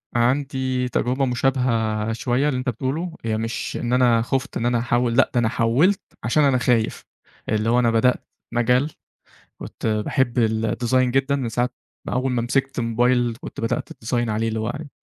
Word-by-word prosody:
عندي 130 0 0
تجربة 130 +2 0
مشابهة 115 -4 0
شويّة 125 +5 0
للي 130 - -1
أنت 130 0 -2
بتقوله 150 - -3
هي 110 -1 0
مش 115 +1 -3
إن 120 0 -2
أنا 120 -2 +4
خفت 135 +4 -2
إن 115 - -2
أنا 120 -1 +2
أحوّل، 120 0 +1
لأ 135 - +4
ده 120 - +2
أنا 115 -2 +2
حوّلت 135 +15 +2 0.2
عشان 135 +7 +2
أنا 135 -2 +4
خايف. 120 -3 +1 0.5
اللي 110 +1 +1
هو 120 +1 +4
أنا 120 -2 +3
بدأت 120 +2 +2 0.3
مجال 125 +5 +2 0.7
كنت - - -7
باحب 120 +4 0
الديزاين 115 +3 +1
جدًا 135 +2 +1
من 130 -4 -2
ساعة 120 +3 0 0.4
من - - -4
أوّل 130 +1 0
ما 120 -2 0
مسكت 135 +3 -1
الموبايل 120 0 +1
كنت - - -8
بدأت 115 - -2
الديزاين 120 0 -2
عليه 110 +1 0
اللي 110 0 -2
هو 110 - -2
يعني 150 0 -7
120 Hz, 180 wpm, -22 LUFS, 115-130 Hz, 0.7 s, أنا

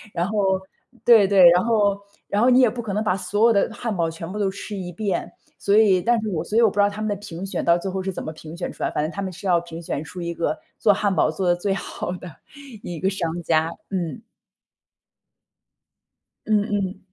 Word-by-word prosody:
然 170 - +1
后 195 -3 +1 0.4
对 225 -5 +7
对， 190 -3 +7
然 180 +3 +3
后 205 -3 +2 0.3
然 205 - +1
后 250 - +5
你 255 +1 +6
也 245 - +5
不 240 +2 -5
可 210 -3 -5
能 210 +2 0
把 195 -3 +1
所 205 +4 +2
有 235 - +5
的 200 - +2
汉 230 -3 -3
堡 165 -2 0
全 165 +2 -7
部 210 - -5
都 195 -2 +1
吃 200 +1 -7
一 180 -1 -5
遍。 200 +1 -2 0.3
所 200 +1 +3
以 195 -5 +5
但 240 +3 +2
是 215 - -3
我 170 -5 -2
所 215 - -2
以 - - +6
我 225 - +6
不 - - -12
知 205 - -1
道 205 - +5
他 205 +1 -7
们 215 - -1
的 - - +1
评 190 -2 -7
选 195 - -3
到 170 0 +5
最 190 +2 -4
后 190 0 -3
是 190 0 -3
怎 - - -5
么 155 - -5
评 160 +1 -10
选 175 - -4
出 - - -14
来， - - +1
反 150 - -1
正 155 - -2
他 200 - -5
们 190 - -3
是 190 - -11
要 175 -2 +3
评 170 -1 -9
选 150 - -3
出 180 +2 -8
一 170 0 -3
个 170 - -1 0.2
做 210 -3 +5
汉 200 -1 0
堡 155 - +2
做 185 +4 -3
得 - - +5
最 195 +2 -1
好 180 -1 -5
的 180 -2 -9 0.5
一 175 - -5
个 190 - +1
商 175 -3 -3
家。 160 0 +2 0.2
嗯。 185 +3 -3 2.2
嗯 210 -2 +2
嗯。 195 -1 -2
195 Hz, 270 characters per minute, -23 LUFS, 175-210 Hz, 2.2 s, 对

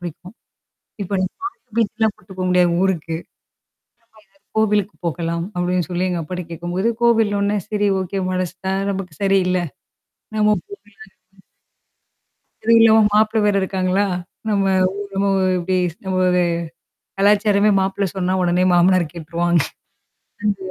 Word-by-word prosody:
பிடிக்கும். 175 +3 -9 0.7
இப்படி 190 0 -1 0.5
பீச்சுக்கெல்லாம் 220 -1 +1
போயிருக்க 185 0 -8
முடியாது 180 -1 +4
ஊருக்கு. 165 -4 -1
கோல்லுக் 165 - -9 1.3
கோவிலுக்கு 210 -2 +1
போகலாம்னு 170 +1 -2
அப்புடினு 180 -2 0
சொல்லி 180 +1 -1
எங்க 175 -2 -2
அப்பாட்ட 180 +3 -5
கேட்கும்போது, 175 +5 -2
கோவில்னோடனே, 210 -3 +2
சேரி 205 -1 +1
ஓகே. 190 +1 -3
மனசுதான் 185 +1 -2
நமக்கு 190 -4 -5
சரியில்ல. 185 -2 +2 0.8
நம்ம 210 0 +4
போல 200 - -10 1.9
அது 230 - +2
இல்லா 225 -1 +6
வோ - - +6
மாப்பிள்ளை 215 +1 +3
வேற 205 -1 +2
இருக்காங்களா? 190 +1 0 0.4
நம்ம 200 -2 +1 0.3
ஊ - - -7 0.2
நம்ம 195 +1 +1 0.3
இப்படி 185 +1 -1
இருக்கும்போதே 180 +1 0 0.7
கலாச்சாரமே 205 +1 +3
மாப்பிள்ளை 195 +1 0
சொன்னா 185 -1 0
உடனே 180 0 +2
மாமனார் 180 0 +4
கேட்டுருவாங்க. 170 +1 0 0.8
அந்த 205 -1 0
190 Hz, 115 wpm, -20 LUFS, 180-205 Hz, 1.9 s, இல்லா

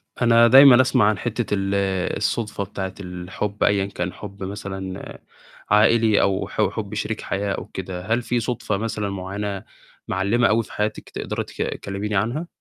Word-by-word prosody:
أنا 115 -1 +5
دايمًا 130 0 +9
أسمع 125 -3 +3
عن 105 - 0
حتّة 115 +1 -2
ال 95 -1 0 0.4
الصدفة 105 -1 -1
بتاعة 95 -1 -5
الحُب 95 +3 -4
أيًا 100 -1 +3
كان 90 -2 -4
حُب 100 -1 -9
مثلًا 95 -1 -6 0.5
عائلي 110 0 +4
أو 95 -1 +1
ح - - -2
حُب 105 -2 -6
شريك 105 +1 -3
حياة 100 0 -2
أو - - -5
كده، 90 -1 -6
هل 115 +3 +1
في 120 0 -1
صدفة 115 -3 -2
مثلًا 105 -1 -3
معيّنة، 100 +1 -4 0.4
معلّمة 100 +6 +2
أوي 115 +2 +2
في - - -14
حياتِك 105 +1 -3
تقدري - - -4
تك - - -15
تكلّميني 100 +2 -3
عنها؟ 120 - -1
105 Hz, 160 wpm, -22 LUFS, 95-115 Hz, 0.5 s, دايمًا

